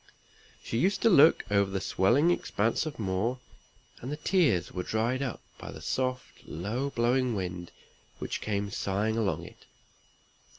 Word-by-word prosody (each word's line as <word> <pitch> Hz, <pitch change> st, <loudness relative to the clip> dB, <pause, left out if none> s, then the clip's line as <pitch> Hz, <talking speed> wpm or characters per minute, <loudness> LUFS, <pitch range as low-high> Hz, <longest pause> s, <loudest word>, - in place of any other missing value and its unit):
She 115 Hz, -, -2 dB
used 190 Hz, +7 st, +1 dB
to 230 Hz, -, +5 dB
look 160 Hz, -1 st, +6 dB
over 100 Hz, -1 st, +3 dB
the 95 Hz, 0 st, -2 dB
swelling 120 Hz, -, +3 dB
expanse 115 Hz, -3 st, 0 dB
of 155 Hz, -, -6 dB
moor, 105 Hz, +4 st, -1 dB, 0.6 s
and 130 Hz, -, -5 dB
the 150 Hz, -, -3 dB
tears 150 Hz, -, +2 dB
were 90 Hz, -, -3 dB
dried 115 Hz, +7 st, -1 dB
up 130 Hz, -4 st, -3 dB, 0.2 s
by -, -, -8 dB
the -, -, -9 dB
soft 130 Hz, -1 st, -3 dB
low 110 Hz, -, -3 dB
blowing 125 Hz, -1 st, +1 dB
wind 90 Hz, -2 st, -4 dB, 0.5 s
which -, -, -4 dB
came 100 Hz, -1 st, -2 dB
sighing 100 Hz, +3 st, -1 dB
along 110 Hz, -4 st, -1 dB
it. -, -, -15 dB
115 Hz, 155 wpm, -29 LUFS, 100-135 Hz, 0.6 s, look